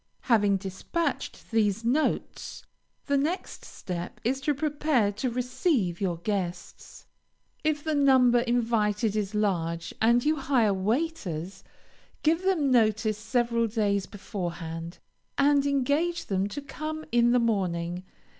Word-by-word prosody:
Having 205 -5 +3
dispatched 195 - -4
these 220 -1 +1
notes, 280 +7 -1 0.4
the 280 -1 +2
next 325 +7 -3
step 175 -1 -6
is 265 +4 0
to 290 +1 +1
prepare 290 -6 +1
to 215 +6 -2
receive 250 - 0
your 180 -4 0
guests. 180 -1 -5 0.6
If 300 -1 0
the 315 - -1
number 260 -4 +5
invited 225 -3 +1
is 210 -1 -2
large, 170 -5 -1
and 235 +3 +4
you 310 +1 +2
hire 255 -7 +2
waiters, 195 - -2 0.6
give 325 +3 +3
them 355 -8 +1
notice 220 -2 +2
several 235 +1 +1
days 205 -3 0
beforehand, 170 -4 -6 0.4
and 285 0 +4
engage 285 +5 0
them 195 0 0
to 275 +8 -6
come 310 +2 -5
in 240 0 +4
the 245 - +4
morning. 180 -6 -1
230 Hz, 125 wpm, -27 LUFS, 195-280 Hz, 0.6 s, number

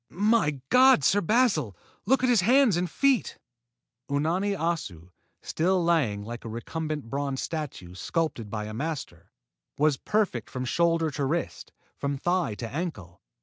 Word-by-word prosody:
"My 200 -7 +1
God, 260 - +6
Sir 205 +8 +3
Basil, 170 - +1 0.3
look 265 +2 +3
at 255 - +3
his 235 -5 +4
hands 245 0 +4
and 175 0 -1
feet!" 275 - +1 0.7
Unani 175 +8 0
Assu, 150 - -3 0.3
still 180 +2 +1
lying 140 -12 +1
like 120 +3 -7
a 115 - -6
recumbent 150 +4 -4
bronze 140 +1 -3
statue 145 - -5
sculptured 125 - -2
by 105 0 -4
a 110 - -7
master, 140 - -5 0.5
was 150 -1 +2
perfect 200 - -1
from 130 0 -4
shoulder 165 +2 +1
to 140 0 -2
wrist, 165 +5 -3 0.3
from 140 0 -2
thigh 175 - 0
to 115 - -5
ankle. 115 - -6
155 Hz, 145 wpm, -27 LUFS, 125-185 Hz, 0.7 s, God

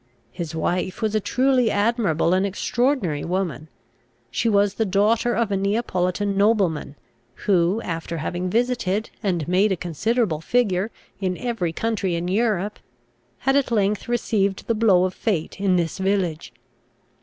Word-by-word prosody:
His 170 -3 -5
wife 180 +3 -1
was 215 -1 +1
a 215 - +2
truly 255 +2 +2
admirable 205 -7 +1
and 185 +1 +2
extraordinary 200 - 0
woman. 170 -5 -3 0.6
She 230 - 0
was 200 -1 +3
the 225 - 0
daughter 215 +5 +2
of 230 -3 0
a - - +2
Neapolitan 200 -1 0
nobleman, 195 -8 +1 0.5
who, 185 +1 +3
after 165 0 -4
having 175 +4 -3
visited, 225 -2 0
and 175 -7 -1
made 190 +4 +3
a - - +2
considerable 175 - -1
figure, 205 -2 +1 0.3
in 185 -2 -1
every 225 -9 -2
country 200 -1 -1
in 170 +1 -2
Europe, 210 0 0 0.6
had 270 +1 +2
at 280 -3 +2
length 210 -3 0
received 205 -5 0
the 230 - +1
blow 210 -5 +4
of 185 - -2
fate 190 -5 -2
in 190 -2 +3
this 170 +1 -1
village. 190 -5 -1
195 Hz, 145 wpm, -23 LUFS, 180-225 Hz, 0.6 s, blow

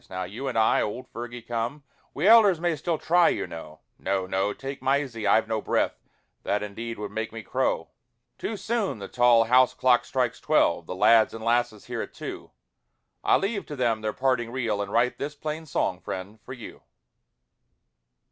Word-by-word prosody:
Now 95 0 -4
you 110 +10 -6
and 125 -3 -2
I, 110 - +4
old 125 +5 -4
Fergie, 120 0 -7
come, 120 +5 -3 0.3
We 155 +7 +1
elders 210 -6 +7
may 170 -1 0
still 165 +3 -2
try, 175 +2 +4
you - - -1
know, 80 -1 -10 0.2
No, 95 -1 -1
no! 95 +2 0
take 135 +5 -7
Mysie, 135 -6 0
I've 110 +2 +4
no 110 -1 -1
breath, - - 0 0.4
That 105 +1 -1
indeed 115 +3 -6
would 105 -1 -5
make 110 +1 -3
me 115 0 -8
crow! - - -1 0.5
Too 220 - -3
soon 220 - -1
the 100 -1 -7
tall 120 -2 +5
house 125 +2 +4
clock 125 -1 +3
strikes 125 -3 -1
twelve, - - +2
The - - -5
lads 115 +4 +5
and 110 0 -7
lasses 120 -2 0
hear - - -4
it - - -8
too, - - -7 0.7
I - - +4
leave 200 +1 -2
them 145 - -7 0.2
to - - -15
their 110 0 -1
parting 130 -3 0
reel, 115 -5 -1
And 100 0 -4
write 120 +3 +1
this 145 +2 -4
plain 155 +2 -5
song, 90 -9 -1
friend, 95 +4 -7
for 130 - -9
you. 125 -3 -10
120 Hz, 185 wpm, -26 LUFS, 105-140 Hz, 0.7 s, elders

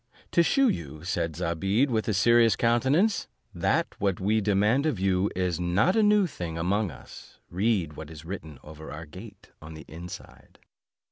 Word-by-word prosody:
"To 170 - +4
shew 275 - +3
you," 75 - -3
said 85 -3 -2
Zobeide 95 - 0
with 110 0 0
a 110 - +1
serious 115 +2 +4
countenance, 135 - +2 0.3
"that - - 0
what 95 -3 0
we 110 +3 +1
demand 105 +8 +2
of 125 -11 -1
you 95 +1 +1
is 90 -2 -1
not 90 - +2
a 220 - +4
new 210 -1 +4
thing 85 - -5
among 100 +5 0
us, 70 - -13
read 95 -4 0
what 75 0 -9
is 80 -1 -11
written 80 -5 -7
over 80 +1 -10
our 80 +2 -7
gate 95 +6 -13
on 80 +1 -10
the 80 - -11
inside." 85 +2 -11
95 Hz, 175 wpm, -27 LUFS, 85-115 Hz, 0.3 s, To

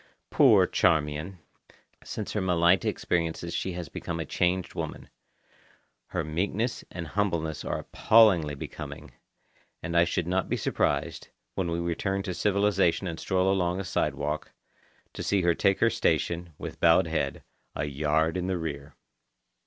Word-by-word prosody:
Poor - - +6
Charmian! 75 +4 +1 0.7
Since 105 - -5
her 105 - 0
Malaita 90 0 +3
experiences 85 0 -2
she 95 - -2
has 85 -2 -5
become - - -5
a - - -3
changed 90 +1 0
woman. - - -6 1.0
Her - - -2
meekness 100 +9 -2
and 90 -2 -6
humbleness 85 -6 -1
are - - -2
appallingly 95 -10 +4
becoming, - - -8 0.7
and 85 0 -3
I 85 0 +6
should 85 0 -1
not 95 +2 -1
be - - 0
surprised, - - -1 0.3
when 95 -3 -2
we 85 - -1
return 90 +3 -1
to 95 - -3
civilization 100 -2 +2
and 85 -2 -4
stroll 95 0 +1
along 90 -1 0
a - - -2
sidewalk, 75 -3 -2 0.6
to - - -6
see 100 -2 +1
her 85 0 +4
take 100 +2 +2
her 115 - +4
station, 85 -4 0
with - - -7
bowed 85 +2 +5
head, 80 0 -2 0.3
a 70 - -1
yard 75 +4 0
in 90 0 -2
the 95 -1 0
rear. 75 -4 -6
85 Hz, 150 wpm, -27 LUFS, 80-95 Hz, 1.0 s, Poor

